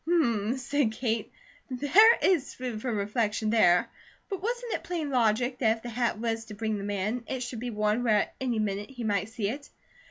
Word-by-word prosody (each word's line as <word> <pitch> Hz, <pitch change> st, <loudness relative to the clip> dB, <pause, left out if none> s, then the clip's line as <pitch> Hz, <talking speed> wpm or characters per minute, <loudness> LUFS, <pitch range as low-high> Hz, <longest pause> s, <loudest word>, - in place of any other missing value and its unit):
"Hummm!" 240 Hz, -8 st, +2 dB
said 260 Hz, -2 st, 0 dB
Kate. 230 Hz, -2 st, -2 dB, 0.4 s
"There 310 Hz, -, +6 dB
IS 335 Hz, -8 st, +2 dB
food 245 Hz, -4 st, -5 dB
for 250 Hz, -, -2 dB
reflection 215 Hz, +1 st, -1 dB
there. 180 Hz, -6 st, +4 dB, 0.4 s
But 385 Hz, -2 st, -3 dB
wasn't 480 Hz, +2 st, -2 dB
it -, -, -3 dB
plain 325 Hz, -5 st, -3 dB
logic, 245 Hz, +1 st, +1 dB
that 225 Hz, -2 st, +3 dB
if 225 Hz, -, -18 dB
the 240 Hz, -, -5 dB
hat 235 Hz, -1 st, 0 dB
was 225 Hz, 0 st, -2 dB
to 215 Hz, -, -9 dB
bring 220 Hz, 0 st, -2 dB
the -, -, -5 dB
man, 205 Hz, +4 st, -2 dB
it 260 Hz, -1 st, -3 dB
should 245 Hz, -1 st, -6 dB
be 245 Hz, +1 st, -4 dB
worn 210 Hz, +1 st, 0 dB
where 215 Hz, -3 st, +4 dB
at -, -, -5 dB
any 245 Hz, -3 st, 0 dB
minute 205 Hz, -1 st, -2 dB
he 250 Hz, -3 st, -7 dB
might 205 Hz, -1 st, 0 dB
see 225 Hz, -3 st, -2 dB
it?" 285 Hz, +5 st, -6 dB
230 Hz, 210 wpm, -28 LUFS, 215-260 Hz, 0.4 s, There